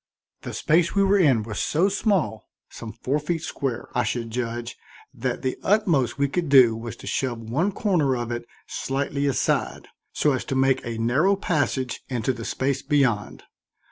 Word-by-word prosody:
The - - -6
space 165 +3 +2
we 200 - +4
were 195 +1 +4
in 135 - +4
was 105 -2 -5
so 170 +6 +2
small, 190 - 0 0.2
some 115 -2 -8
four 130 +6 -2
feet 165 +2 -3
square, 130 -7 -4
I 125 - +3
should 115 -2 -3
judge, 120 0 -3 0.4
that - - -3
the 130 - -2
utmost 175 - +2
we 140 0 +2
could 165 +2 -2
do 130 -5 +7
was 115 +1 -6
to - - -13
shove 125 -3 -1
one 135 - -1
corner 170 - +1
of 120 0 -4
it 120 0 -4 0.2
slightly 140 +1 -2
aside, 130 -3 -1 0.2
so 150 - +2
as 130 - -1
to 135 - -3
make 130 0 +2
a 115 -2 -4
narrow 135 +13 +2
passage 145 - -1
into 125 0 -1
the 115 -2 -7
space 135 0 -1
beyond. 130 -9 0
135 Hz, 175 wpm, -24 LUFS, 120-160 Hz, 0.4 s, do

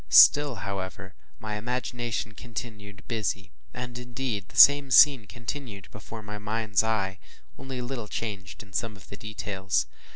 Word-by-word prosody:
Still, 145 - +8
however, 95 -1 -5 0.2
my 105 +6 -4
imagination 120 -1 -3
continued 105 -2 -8
busy, 105 -4 -2 0.2
and 125 0 -6
indeed 120 -5 -4
the - - -12
same 140 -1 +8
scene 130 -3 +7
continued 115 -5 -7
before 110 +1 -9
my 105 0 -7
mind’s 105 -1 +1
eye, 100 -4 -1 0.4
only 135 -1 -6
a 125 - -3
little 120 -4 -5
changed 100 -2 -5
in 100 -2 -19
some 110 +4 -2
of 95 - -17
the - - -7
details. 100 - -2
110 Hz, 150 wpm, -27 LUFS, 100-120 Hz, 0.4 s, Still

